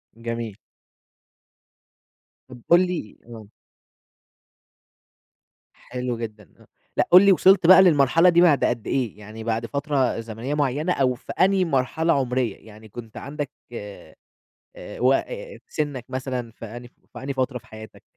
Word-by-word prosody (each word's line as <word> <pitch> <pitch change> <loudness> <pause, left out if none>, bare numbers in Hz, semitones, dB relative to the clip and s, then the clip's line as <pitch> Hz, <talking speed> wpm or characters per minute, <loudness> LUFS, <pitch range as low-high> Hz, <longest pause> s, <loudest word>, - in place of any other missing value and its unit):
جميل. 115 -2 -5 1.9
طَب 125 -2 -12
قُل 170 - +7
لي 175 - -5
آه. 115 -3 -11 2.3
حلو 125 -1 -5
جدًا، 110 -6 -8
آه. - - -25 0.3
لأ، - - +2
قُل 180 - +10
لي 200 - +7
وصلت 190 -1 +5
بقى 190 +1 +9
للمرحلة 165 0 +5
دي 170 0 +4
بعد 160 -6 +4
قد 120 -3 -2
إيه، 120 -6 -2
يعني 110 +2 -10
بعد 115 0 -2
فترة 140 0 -1
زمنية 115 +4 -5
معيّنة، 150 +4 0
أو 130 -2 +1
في 125 - -10
أنهي 190 0 +2
مرحلة 160 +3 +1
عُمرية 125 -3 -1
يعني 110 0 -14
كنت 110 +1 -10
عندك 145 0 -5 0.2
آآ، 105 -3 -10 0.8
وق 130 +2 +3 0.4
سِنّك 145 -5 -4
مثلًا 130 -2 -4
في 115 - -11
أنهي 120 +3 -9
ف 120 - -27 0.2
في - - -8
أنهي 140 +1 -3
فترة 130 -1 -2
في - - -16
حياتك؟ 110 0 -12
125 Hz, 140 wpm, -23 LUFS, 115-150 Hz, 2.3 s, قُل